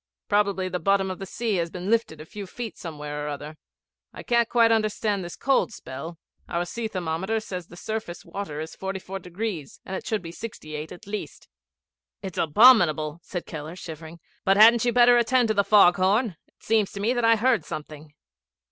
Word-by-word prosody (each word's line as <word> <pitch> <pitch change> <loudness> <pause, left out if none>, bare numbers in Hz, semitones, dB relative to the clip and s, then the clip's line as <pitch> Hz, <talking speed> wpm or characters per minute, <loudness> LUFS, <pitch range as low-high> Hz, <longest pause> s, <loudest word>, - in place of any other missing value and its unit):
Probably 200 -2 +1
the 180 0 -3
bottom 195 0 +2
of 185 - -7
the 195 - -6
sea 220 -1 -1
has 170 -1 -1
been 180 +2 -6
lifted 225 -9 +1
a 155 - -9
few 200 +4 -8
feet 230 +3 -6
somewhere 150 -3 -6
or 150 - -3
other. 150 +1 -6 0.6
I - - -10
can't 235 -1 +2
quite 230 -1 +4
understand 215 -2 0
this 175 - -7
cold 270 -3 +1
spell. 160 -2 -8 0.3
Our 170 +1 -1
sea 225 +5 -4
thermometer 185 +3 -2
says 180 -5 -7
the 175 - -13
surface 215 -4 -5
water 160 -7 -5
is 160 +1 -6
44°, 190 -3 -5
and 190 - -5
it - - -6
should 215 -4 -1
be 165 - -7
68° 155 -7 -7
at 195 - -11
least.' 205 +1 -6 0.8
'It's 190 -3 -5
abominable,' 165 - +5
said 175 0 -6
Keller, 155 +1 -7
shivering. 165 -1 -9 0.2
'But 195 +1 +3
hadn't 230 +2 +7
you 240 - +3
better 245 0 +6
attend 240 0 +2
to - - +3
the 200 -1 +3
fog 195 -4 +6
horn? 200 +2 +2
It - - -32
seems 220 -3 +2
to 200 - -6
me 220 +5 +1
that 240 -1 -1
I 230 0 +6
heard 230 -4 +2
something.' 150 0 -8
190 Hz, 190 wpm, -25 LUFS, 165-220 Hz, 0.8 s, hadn't